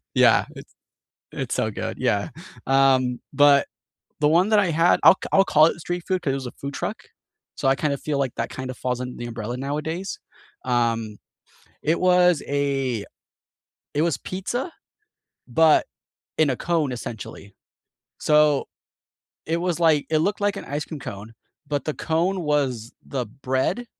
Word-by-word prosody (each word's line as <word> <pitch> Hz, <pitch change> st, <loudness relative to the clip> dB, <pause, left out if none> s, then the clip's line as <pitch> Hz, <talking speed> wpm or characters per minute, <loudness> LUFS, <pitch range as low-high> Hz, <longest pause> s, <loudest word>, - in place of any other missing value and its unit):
Yeah, -, -, +5 dB
it's -, -, -12 dB, 0.6 s
it's -, -, -4 dB
so -, -, 0 dB
good, -, -, -5 dB
yeah. 100 Hz, +7 st, 0 dB, 0.4 s
Um, 130 Hz, -2 st, +3 dB
but 145 Hz, -1 st, +5 dB, 0.5 s
the 150 Hz, -, +3 dB
one 175 Hz, +6 st, +3 dB
that 215 Hz, -, +4 dB
I 185 Hz, -4 st, +2 dB
had 165 Hz, +3 st, +3 dB
I'll -, -, +9 dB
c -, -, -4 dB
I'll 195 Hz, -, +6 dB
call 155 Hz, +1 st, +5 dB
it 170 Hz, -, -3 dB
street 175 Hz, +1 st, -4 dB
food 185 Hz, -2 st, 0 dB
'cause 135 Hz, -, 0 dB
it -, -, -1 dB
was 130 Hz, -2 st, -5 dB
a -, -, -7 dB
food 140 Hz, 0 st, -7 dB
truck, -, -, -3 dB, 0.6 s
so -, -, -1 dB
I 135 Hz, -, +4 dB
kinda 145 Hz, -1 st, 0 dB
feel 145 Hz, 0 st, -3 dB
like 130 Hz, -3 st, -1 dB
that 115 Hz, -, -2 dB
kinda 130 Hz, -1 st, -6 dB
falls 125 Hz, 0 st, -3 dB
under 125 Hz, 0 st, -5 dB
the 120 Hz, -, -5 dB
umbrella 120 Hz, +1 st, -5 dB
nowadays. 150 Hz, +7 st, -4 dB, 0.5 s
Um, 115 Hz, -3 st, 0 dB, 0.7 s
it 160 Hz, +3 st, +1 dB
was 180 Hz, -3 st, +4 dB
a 135 Hz, -6 st, -1 dB, 0.9 s
it 145 Hz, -, +1 dB
was 165 Hz, -7 st, +1 dB
pizza, 240 Hz, -, -4 dB, 0.8 s
but 155 Hz, +5 st, +4 dB, 0.5 s
in 155 Hz, -3 st, +3 dB
a 130 Hz, -, -1 dB
cone, 160 Hz, -6 st, 0 dB
essentially. 105 Hz, -4 st, -8 dB, 0.7 s
So, 150 Hz, -2 st, +3 dB, 0.8 s
it 165 Hz, +1 st, 0 dB
was, 175 Hz, -1 st, -1 dB
like 155 Hz, -4 st, +3 dB
it 155 Hz, -, +2 dB
looked 205 Hz, +5 st, 0 dB
like 205 Hz, -1 st, +1 dB
an -, -, -7 dB
ice 150 Hz, +1 st, -3 dB
cream 155 Hz, -3 st, -7 dB
cone, 105 Hz, 0 st, -8 dB, 0.3 s
but 145 Hz, 0 st, -2 dB
the 155 Hz, -, -1 dB
cone 175 Hz, +3 st, 0 dB
was 130 Hz, -6 st, -1 dB
the 130 Hz, -3 st, -3 dB
bread, 130 Hz, -, -2 dB
145 Hz, 170 wpm, -23 LUFS, 130-165 Hz, 0.9 s, I'll